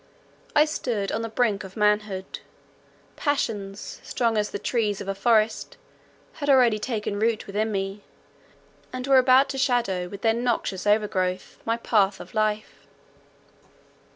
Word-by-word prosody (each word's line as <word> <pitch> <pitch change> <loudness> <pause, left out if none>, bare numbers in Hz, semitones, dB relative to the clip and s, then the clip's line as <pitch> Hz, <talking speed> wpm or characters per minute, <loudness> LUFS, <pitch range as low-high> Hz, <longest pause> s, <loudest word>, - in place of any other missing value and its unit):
I 300 0 +6
stood 235 -10 -2
on 220 - -1
the 225 - -4
brink 220 -3 0
of 190 +1 -11
manhood; 210 -2 0 0.8
passions, 210 -9 -3
strong 230 -2 0
as 210 -1 0
the - - -4
trees 215 -5 -1
of - - -7
a 195 - -1
forest, 220 +1 +1 0.6
had 285 - -1
already 245 -5 +5
taken 210 -3 -3
root 225 0 0
within 215 +2 -1
me, 195 0 -3 0.9
and 255 0 -5
were 270 -1 +6
about 260 +2 +5
to 270 0 -3
shadow 240 -9 +1
with 200 +2 -10
their 225 -1 +4
noxious 230 -5 -1
overgrowth, 190 -3 0
my 230 0 0
path 205 -4 +2
of 180 - -11
life. 215 -1 -2
215 Hz, 145 wpm, -25 LUFS, 200-240 Hz, 0.9 s, I